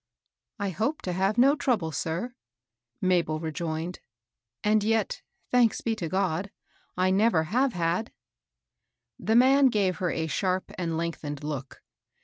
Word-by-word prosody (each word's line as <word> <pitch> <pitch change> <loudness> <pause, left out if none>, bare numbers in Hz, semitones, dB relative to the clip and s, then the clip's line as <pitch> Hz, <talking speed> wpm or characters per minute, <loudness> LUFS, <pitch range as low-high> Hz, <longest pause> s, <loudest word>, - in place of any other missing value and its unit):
" - - -54
I 200 -1 -1
hope 250 - -2
to 180 - -2
have 195 +4 +1
no 270 +4 +6
trouble, 220 - 0
sir," 170 - -3 0.7
Mabel 175 -4 +1
re 160 0 -3
joined. 165 +1 -4 0.3
" 115 +1 -62
As 210 0 +3
yet, 220 -1 0
— - - -45
thanks 245 -3 +3
be 225 -1 -1
to 170 -5 -3
God! 190 0 0 0.3
— - - -35
I 185 +1 +3
never 195 -4 +3
have 245 - +1
had." 175 +5 -1 1.1
The 220 - +1
man 265 +3 +6
gave 195 -7 +1
her 180 0 -1
a 160 - -1
sharp 185 +3 -1
and 165 -3 -2
lengthened 155 -3 -4
look. 140 -3 -6
185 Hz, 160 wpm, -27 LUFS, 160-220 Hz, 1.1 s, no